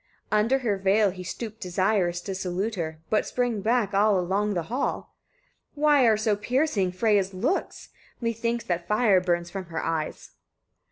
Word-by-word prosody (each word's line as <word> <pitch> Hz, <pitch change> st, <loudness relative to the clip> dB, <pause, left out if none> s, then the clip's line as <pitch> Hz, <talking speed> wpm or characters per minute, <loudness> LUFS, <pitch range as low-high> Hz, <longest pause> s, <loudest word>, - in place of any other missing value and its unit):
28. 215 Hz, -, +3 dB
Under 240 Hz, +6 st, +2 dB
her 205 Hz, -2 st, +1 dB
veil 195 Hz, +1 st, +3 dB
he 185 Hz, 0 st, -8 dB
stooped 220 Hz, +4 st, -6 dB
desirous 185 Hz, -1 st, 0 dB
to 195 Hz, -, -5 dB
salute 190 Hz, +3 st, -2 dB
her, 160 Hz, -5 st, -4 dB
but 215 Hz, -, +3 dB
sprang 245 Hz, -4 st, -1 dB
back 220 Hz, -2 st, +1 dB
along 200 Hz, 0 st, +2 dB
the 175 Hz, -, -1 dB
hall. 245 Hz, -, -3 dB, 0.6 s
"Why 290 Hz, -4 st, +4 dB
are 220 Hz, -2 st, +4 dB
so 215 Hz, -1 st, +1 dB
piercing 230 Hz, -3 st, 0 dB
Freyia's 195 Hz, -1 st, +1 dB
looks? 265 Hz, -, -2 dB, 0.3 s
Methinks 230 Hz, 0 st, -1 dB
that 175 Hz, -1 st, -3 dB
fire 210 Hz, -3 st, +3 dB
burns 175 Hz, -1 st, -1 dB
from 195 Hz, 0 st, -5 dB
her 165 Hz, -1 st, -5 dB
eyes." 160 Hz, -2 st, -3 dB
205 Hz, 160 wpm, -26 LUFS, 180-230 Hz, 0.6 s, Why